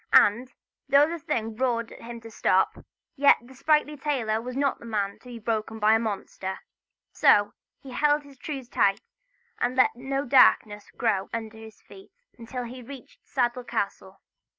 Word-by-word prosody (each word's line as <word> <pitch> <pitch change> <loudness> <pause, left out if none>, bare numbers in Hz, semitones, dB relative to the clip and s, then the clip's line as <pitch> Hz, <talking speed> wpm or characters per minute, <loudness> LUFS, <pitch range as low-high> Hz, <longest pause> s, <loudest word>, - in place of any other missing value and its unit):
And 240 +5 +5 0.4
though 280 +2 +6
the 335 +1 -4
thing 225 -6 -3
roared 235 -2 -1
to - - -13
him 235 0 -8
to 225 0 -11
stop, - - +1 0.3
yet 285 -1 +6
the 245 +2 -16
sprightly 300 +2 +1
tailor 250 -7 -1
was 250 +2 -6
not 280 -1 0
the - - -12
man 205 -3 -2
to - - -26
be 245 -1 -8
beholden 220 0 -3
to 210 - -1
a 220 +1 +5
monster. 195 -3 -4 0.5
So 205 0 +4 0.3
he 270 - -10
held 295 +3 +2
his 280 -2 -17
trews 275 -6 -6
tight, 195 -4 +2 0.6
and 250 - 0
let 255 - +4
no 270 +3 -3
darkness 215 -5 +4
grow 200 -5 -1
under 225 -1 -5
his 220 -1 -13
feet 385 0 -15 0.2
until 245 +2 -6
he 240 +2 -8
had 245 -2 -12
reached 275 -3 -12
Saddell 250 -1 0
Castle. 195 -3 -4
240 Hz, 175 wpm, -26 LUFS, 220-270 Hz, 0.6 s, though